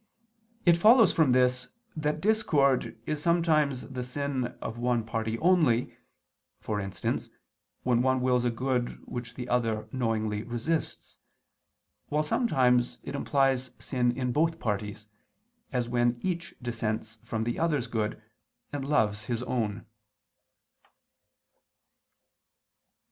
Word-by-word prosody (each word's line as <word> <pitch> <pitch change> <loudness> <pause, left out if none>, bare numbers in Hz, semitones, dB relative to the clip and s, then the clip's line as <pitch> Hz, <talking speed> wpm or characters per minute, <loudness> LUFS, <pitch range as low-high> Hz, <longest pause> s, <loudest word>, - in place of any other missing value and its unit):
It 170 -1 +6
follows 220 +2 +6
from 155 -5 +4
this 125 0 +3 0.3
that 150 0 -1
discord 155 - +2
is 150 -1 -2
sometimes 155 -5 +2
the 130 -2 -5
sin 130 0 -3
of 115 - -6
one 120 -1 +1
party 110 0 -2
only, 155 -7 +3 0.6
for 105 -1 -3
instance, 95 -1 -3 0.5
when 120 -1 +3
one 130 0 +2
wills 125 -1 +2
a 120 - +2
good 125 +1 -2
which 120 -1 -6
the 125 -1 -5
other 115 -3 0
knowingly 110 -4 -1
resists; 120 +9 -3 0.9
while 150 +1 +1
sometimes 130 - +2
it - - -6
implies 135 -2 +1
sin 125 -2 0
in 125 -2 -1
both 165 +5 +1
parties, 105 -1 -3 0.7
as 125 -2 -1
when 120 0 +1
each 175 -2 -3
dissents 110 -2 -3
from 110 -1 -2
the 120 +1 -2
other's 150 -7 +1
good, 110 -3 -2 0.5
and 145 -1 -3
loves 110 -8 +1
his 120 +1 -2
own. 110 -4 -2
125 Hz, 120 wpm, -28 LUFS, 115-145 Hz, 0.9 s, It